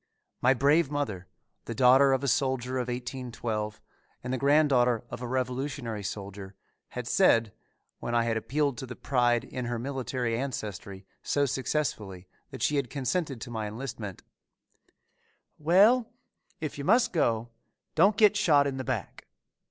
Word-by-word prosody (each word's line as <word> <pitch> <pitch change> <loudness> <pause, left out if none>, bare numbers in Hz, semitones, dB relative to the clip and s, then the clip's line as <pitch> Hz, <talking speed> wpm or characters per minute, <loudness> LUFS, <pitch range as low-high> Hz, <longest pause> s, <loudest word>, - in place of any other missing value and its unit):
My 130 +2 +4
brave 145 +4 +3
mother, 110 -12 -3 0.4
the 115 - -5
daughter 130 +3 +6
of 135 0 +1
a - - 0
soldier 130 -1 0
of 125 - -2
1812 120 -4 -4 0.4
and 125 +1 -3
the - - 0
granddaughter 135 -5 +3
of - - -6
a 125 - -4
Revolutionary 125 -2 -3
soldier 100 0 -7 0.4
had - - -3
said, 115 -2 +3 0.5
when 120 - -3
I 120 - +3
had 115 -1 0
appealed 140 +2 -1
to 130 - -6
the 125 - -7
pride 120 -3 +1
in 125 -1 -5
her 120 0 -2
military 125 -2 -2
ancestry 105 -6 -5 0.2
so 145 0 +1
successfully 115 -9 -2 0.2
that - - -6
she 150 - +2
had 135 -4 -1
consented 140 0 -2
to 120 - -7
my 110 -2 -3
enlistment, 110 -3 -7 1.4
"Well, 205 +10 +4 0.5
if 155 -2 -5
you - - -4
must 230 - +3
go, 115 -8 +1 0.4
don't 195 +6 +4
get 210 -2 +5
shot 150 -8 +4
in 135 -1 -2
the 130 - -3
back." - - -4
125 Hz, 150 wpm, -28 LUFS, 115-140 Hz, 1.4 s, daughter